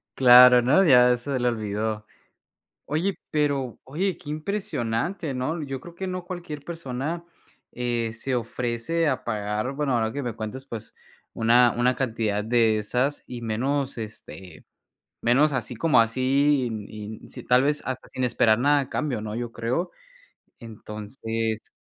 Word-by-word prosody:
Claro, 125 -1 +8
no, 135 +11 +4
ya 125 -4 +6
se 130 +1 -3
le 125 - +1
olvidó. 110 -1 -3 0.8
Oye, 170 +7 -1
pero 140 -5 0
oye, 180 +8 -2
qué 155 -5 -10
impresionante, 155 - -2
¿no? 155 +6 -2
Yo 135 -2 -5
creo 175 +3 -12
que 190 +2 -5
no 185 -1 -4
cualquier 175 -5 -7
persona, 165 0 -4 0.5
eh, 120 -2 -2
se 130 +3 -2
ofrece 120 +7 -1
a 130 -2 -1
pagar, 105 +2 -2
bueno, 140 -2 -1
ahora 110 -2 0
que 140 - -4
me 120 -4 -3
cuentes, 115 +4 -6
pues, 115 -5 -8 0.4
una 120 +2 +4
una 125 +1 +2
cantidad 110 -5 -1
de 115 -1 +3
esas 125 +7 -1
y 120 -1 -7
menos, 130 +4 -1
este, 95 -5 -9 0.6
menos 140 +6 +4
así 125 -1 -2
como 150 +5 +3
así, 130 +4 +2
in 110 -3 -4
in 105 0 -9
si - - -9
tal 125 +1 +4
vez 145 +2 0
hasta 130 0 -5
sin 130 - -4
esperar 115 -2 +3
nada 145 +4 +3
a 135 - -3
cambio, 135 -8 -2
¿no?, 105 0 -5
yo 120 0 -4
creo. 125 - -2 0.7
Entonces 110 0 -5
125 Hz, 155 wpm, -25 LUFS, 115-145 Hz, 0.8 s, Claro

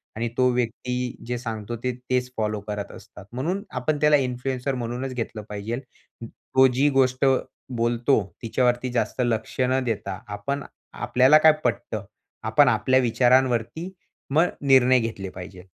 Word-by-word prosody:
आणि 115 +2 -2
तो 125 0 +4
व्यक्ती 125 +1 -2
जे 125 0 -2
सांगतो 115 -1 -5
ते 125 - +1 0.2
तेच 125 0 0
फॉलो 105 -1 -1
करत 105 -1 -4
असतात. 100 - -13
म्हणून 165 +11 -2 0.2
आपण 145 +4 -1
त्याला 150 0 +5
इन्फ्लुएन्सर 125 +2 -3
म्हणूनच 125 +2 -4
घेतलं 115 -3 -4
पाहिजेल. 105 +4 -4 0.4
अं, - - -5
तो 130 +3 +2
जी 130 +3 +2
गोष्ट 130 0 +2 0.5
बोलतो 120 +2 +2 0.2
तिच्यावरती 125 +2 0
जास्त 120 +1 -1
लक्ष 115 0 -2
न 130 +1 +2
देता 100 -5 -3
आपण 105 +8 -4 0.3
आपल्याला 125 +4 +4
काय 160 - +9
पटतं, 120 -4 -2 0.4
आपण 110 +6 +4
आपल्या 130 +3 +3
विचारांवरती, 125 +5 +2 0.4
मग 160 +5 +4
निर्णय 130 -2 +5
घेतले 110 -5 -4
पाहिजे. 90 0 -10
125 Hz, 145 wpm, -24 LUFS, 115-130 Hz, 0.5 s, काय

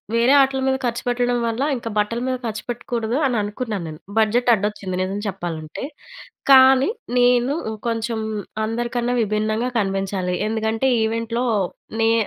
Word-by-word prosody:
వేరే 235 +4 +4
ఆటుల 265 0 +1
మీద 265 0 +2
ఖర్చు 235 0 -1
పెట్టడం 245 0 +1
వల్ల 230 +2 -2 0.2
ఇంక 230 - -7
బట్టల 210 +3 0
మీద 255 - 0
ఖర్చు 215 -1 -4
పెట్టకూడదు 240 0 -2
అని 245 -3 0
అనుకున్నాను 205 -3 -4
నేను, 155 - -9 0.2
బడ్జెట్ 235 +3 +3
అడ్డొచ్చింది 205 -3 -2
నిజం 195 +2 -3
చెప్పాలంటే. 170 -4 -5 0.7
కానీ 265 +3 +7 0.3
నేను 245 +2 +4 0.3
కొంచెం 230 0 -1 0.5
అందరికన్నా 240 +2 -1
విభిన్నంగా 215 +3 0
కనిపించాలి. 195 -2 -1
ఎందుకంటే 220 +3 0 0.2
ఈవెంట్‍లో 230 +2 -1 0.6
నే 225 - +4
230 Hz, 130 wpm, -21 LUFS, 210-245 Hz, 0.7 s, కానీ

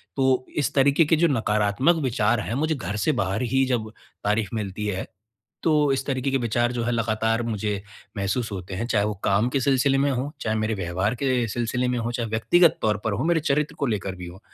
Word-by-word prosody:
तो 130 -1 +2
इस 145 -1 0
तरीके 140 +4 +4
के 160 - +3
जो 170 +2 +3
नकारात्मक 110 +3 +2
विचार 115 -3 +1
है 105 +3 -3
मुझे 155 +3 0
घर 120 -6 -4
से 105 +8 +1
बाहर 100 -6 -1
ही 135 +2 +2
जब 115 -4 -2 0.3
तारीफ़ 105 0 0
मिलती 105 -1 -4
है, 95 -2 -3 0.6
तो 150 -3 +3
इस 135 - -2
तरीके 135 -1 -1
के 135 - +2
विचार 120 0 0
जो 120 -1 -2
है 120 - 0
लगातार 115 0 0
मुझे 105 -3 -2 0.4
महसूस 105 +4 -1
होते 95 0 -6
हैं, 110 +5 -2
चाहे 105 -4 +2
वो 105 - -1
काम 100 +4 +3
के 135 - 0
सिलसिले 135 +1 +2
में 140 +1 +2
हों, 130 +2 -2
चाहे 110 -1 -1
मेरे 110 +1 0
व्यवहार 95 +4 -1
के 125 -2 0
सिलसिले 120 +3 -1
में 125 - 0
हों, 115 +1 -2
चाहे 115 -2 -3
व्यक्तिगत 160 +10 +3
तौर 105 -1 +2
पर 110 - +1
हों, 110 +9 -1
मेरे 170 -1 +3
चरित्र 150 0 0
को 145 - +1
लेकर 100 -4 -2
भी 90 -1 -8
हों। 90 +2 -11
120 Hz, 225 wpm, -24 LUFS, 105-135 Hz, 0.6 s, तरीके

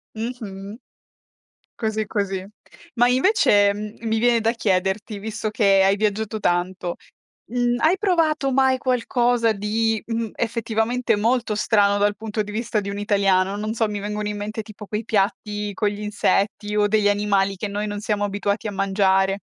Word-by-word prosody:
Mh-mh. 215 -4 -6 1.0
Così, 220 -1 -2
così. 195 -3 -2 0.5
Ma 240 0 +4
invece, 250 - +4
uhm, 210 +1 -6
mi 220 0 +1
viene 235 0 +3
da 225 +1 +2
chiederti 200 0 -1
visto 215 +1 -4
che 195 -2 +3
hai 195 +1 +4
viaggiato 215 +1 -1
tanto, 175 -1 -1 0.6
mhmm, 245 0 +1
hai 340 +5 +3
provato 320 -8 +1
mai 265 0 +3
qualcosa 245 -2 +1
di, 220 +2 -1
mhmm, 225 -2 -3
effettivamente 230 +1 0
molto 230 +1 +1
strano 205 -1 +2
dal 205 0 +1
punto 215 +1 -3
di 210 - -8
vista 220 0 -1
di 200 - -6
un 200 - -5
italiano? 200 -2 +2
Non 215 +2 -3
so, 225 -1 +1
mi 205 -1 -4
vengono 210 +1 -3
in 210 - -3
mente 215 +2 -4
tipo 210 -1 -11
quei 215 +2 -3
piatti 210 0 -1
con 210 - +1
gli 205 0 -5
insetti 210 0 0
o 210 0 +3
degli 210 -1 +3
animali 200 -1 +1
che 205 +2 -4
noi 205 +1 -3
non 205 0 -4
siamo 205 -1 -1
abituati 205 +1 -2
a 210 - -3
mangiare. 195 -1 +2
210 Hz, 165 wpm, -22 LUFS, 200-225 Hz, 1.0 s, Ma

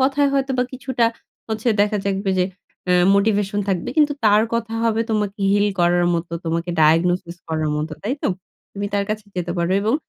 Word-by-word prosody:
কথায় 280 +2 +3
হয়তোবা 265 -2 +1
কিছুটা 255 -2 -1 0.4
হচ্ছে 220 +2 -1
দেখা 210 +1 +2
যাক 195 -1 0
বে 195 - +1
যে 180 - +3 0.5
আ - - +5 0.2
মোটিভেশন 205 0 +1
থাকবে। 180 -3 -1
কিন্তু 295 -1 +4
তার 210 +1 +5
কথা 225 -1 -2
হবে, 225 -1 +1
তোমাকে 210 -1 -1
হিল 205 0 +3
করার 175 0 +3
মতো, 170 0 -3
তোমাকে 165 +1 -2
ডায়াগনোসিস 170 +2 +2
করার 155 -1 -1
মতো, 155 +1 -3
তাই 235 +6 -1
তো? - - +1 0.4
তুমি 205 0 -3
তার 200 0 +1
কাছে 215 0 -3
যেতে 175 -1 -2
পারো।" 170 +1 0
এবং 220 +4 +1
205 Hz, 185 wpm, -21 LUFS, 175-225 Hz, 0.5 s, আ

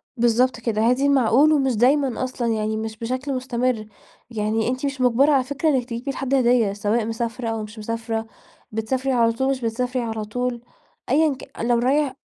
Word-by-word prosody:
بالضبط 240 +1 +2
كده، 225 -2 -1
هاتي 255 +3 +2
المعقول، 280 +2 +4
ومش 270 -4 +2
دايمًا 260 +2 +2
أصلًا، 255 -2 -3
يعني 215 0 -1
مش 220 0 -5
بشكل 255 +5 -3
مستمر، 250 -3 -1 0.4
يعني 220 0 -1
أنتِ 255 +2 -2
مش 275 -1 -3
مُجبرة 255 +4 +4
على 270 -3 +3
فكرة 285 +4 -1
إنِّك 260 -4 +1
تجيبي 235 +4 -3
لحد 270 0 -3
هدية 240 -5 +3
سواء 210 +3 0
مسافرة 230 +1 -3
أو 225 -1 -3
مش 215 +1 -10
مسافرة، 225 0 -3 0.4
بتسافري 255 +5 -1
على 230 -2 +3
طول، 265 +4 -1
مش 270 -1 -1
بتسافري 245 +2 -1
على 220 -2 -3
طول، 245 +2 -3 0.5
أيًا 300 +3 +3
ك 265 +1 -14
لو 235 +1 +2
رايح 270 +3 +1
245 Hz, 180 wpm, -22 LUFS, 225-265 Hz, 0.5 s, المعقول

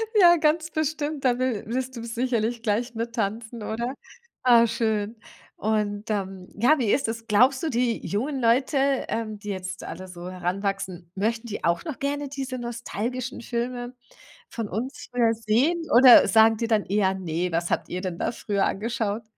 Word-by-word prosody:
Ja, 350 -4 +7
ganz 315 +1 +1
bestimmt. 310 -1 -2
Da 245 -1 +3
will 255 -5 -1
willst 260 +2 -3
du 230 - -6
sicherlich 235 -1 -1
gleich 235 +2 -1
mit 230 +1 -3
tanzen, 220 +2 -3
oder? 235 +4 -3 0.5
Ah, 240 -2 +6
schön. 220 -1 -1 0.4
Und 210 -1 -1
dann 195 -3 -3
ja, 255 +8 +4
wie 225 -5 +1
ist 275 - +1
es, 230 0 -6
glaubst 250 +5 +4
du, 325 - 0
die 240 -3 0
jungen 265 +8 -2
Leute, 250 +5 +2 0.3
ähm, 220 -2 -3
die 210 0 -8
jetzt 185 -1 -5
alle 185 - -7
so 180 0 -8
heranwachsen, 185 -1 -3
möchten 225 +4 -1
die 210 - -6
auch 170 0 +1
noch 310 -7 -6
gerne 285 0 -2
diese 270 -2 -4
nostalgischen 240 +1 -4
Filme 245 +1 -3 0.5
von 225 - -5
uns, 260 +8 -5
äh, 235 -2 +3
sehen 230 +10 +1
oder 245 0 +9
sagen 220 0 +5
die 230 - -1
dann 220 -3 +2
eher: 195 -1 +2
„Ne, 180 -1 -2
was 170 +1 -1
habt - - -1
ihr 180 - -3
denn 185 -3 -4
da - - -1
früher 205 -4 -1
angeschaut?“ 225 0 -2
230 Hz, 175 wpm, -25 LUFS, 205-255 Hz, 0.5 s, oder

